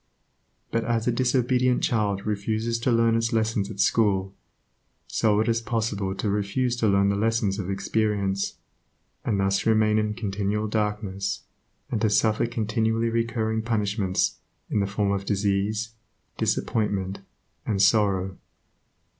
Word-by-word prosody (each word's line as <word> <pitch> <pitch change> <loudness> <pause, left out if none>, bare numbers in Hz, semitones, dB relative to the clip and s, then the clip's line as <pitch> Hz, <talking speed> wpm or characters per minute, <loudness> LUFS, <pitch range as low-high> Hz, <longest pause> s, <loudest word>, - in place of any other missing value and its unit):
But 115 0 0
as 115 -1 0
a 125 - +2
disobedient 125 0 +2
child 100 -4 0
refuses 110 +2 -1
to 120 +2 +1
learn 115 -1 +3
its 115 0 +1
lessons 110 -3 0
at 105 -3 -8
school, 100 -2 +2 0.7
so 105 -2 +2
it 110 - -1
is 115 0 +1
possible 105 -4 -2
to 105 - -3
refuse 105 +5 0
to 115 - +1
learn 100 0 +3
the 100 - +1
lessons 110 -1 0
of 95 -1 -4
experience, 100 -1 -1 0.7
and 105 -4 0
thus 95 0 +2
to - - 0
remain 110 -1 +3
in 105 0 -1
continual 105 0 -2
darkness, 105 -2 -2 0.5
and 110 - -1
to 110 - +3
suffer 110 +2 +2
continually 115 0 0
recurring 115 -1 0
punishments 105 -4 0 0.3
in - - +2
the 100 - +1
form 100 0 0
of 100 -1 -1
disease, 100 +2 0 0.4
disappointment, 100 -3 -1 0.5
and 105 -3 0
sorrow. 95 -2 +2
105 Hz, 140 wpm, -25 LUFS, 100-115 Hz, 0.7 s, learn